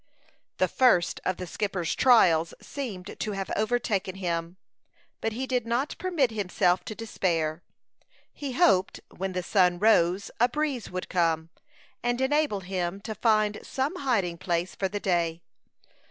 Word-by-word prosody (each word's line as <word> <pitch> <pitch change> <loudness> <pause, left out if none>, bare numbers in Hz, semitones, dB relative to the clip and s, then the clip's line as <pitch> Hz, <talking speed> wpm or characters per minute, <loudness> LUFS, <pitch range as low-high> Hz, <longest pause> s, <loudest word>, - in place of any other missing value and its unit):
The - - +3
first 235 -10 +3
of 185 - 0
the 180 - -5
skipper's 180 -1 -2
trials 170 -10 +4
seemed 205 -10 -6
to 215 - -2
have 195 -1 -4
overtaken 215 -4 0
him; 170 -1 -3 0.6
but 225 - -1
he 255 +4 -3
did 250 -3 -1
not 245 +6 -1
permit 335 -9 +1
himself 185 -3 +1
to 215 - -6
despair. 170 -7 -1 0.7
He 280 -3 -5
hoped, 195 - +3 0.2
when 190 0 -3
the 180 0 -2
sun 180 -2 +3
rose, 190 -2 +3
a 245 +2 +4
breeze 280 -4 -2
would 185 0 -5
come, 165 -2 0 0.5
and 240 +1 0
enable 275 -5 +1
him 185 0 -3
to 220 - -5
find 215 -1 +2
some 265 +2 -2
hiding 200 -11 0
place 175 0 -1
for 195 - -1
the 205 +2 -4
day. 170 -3 0
195 Hz, 150 wpm, -27 LUFS, 175-240 Hz, 0.7 s, trials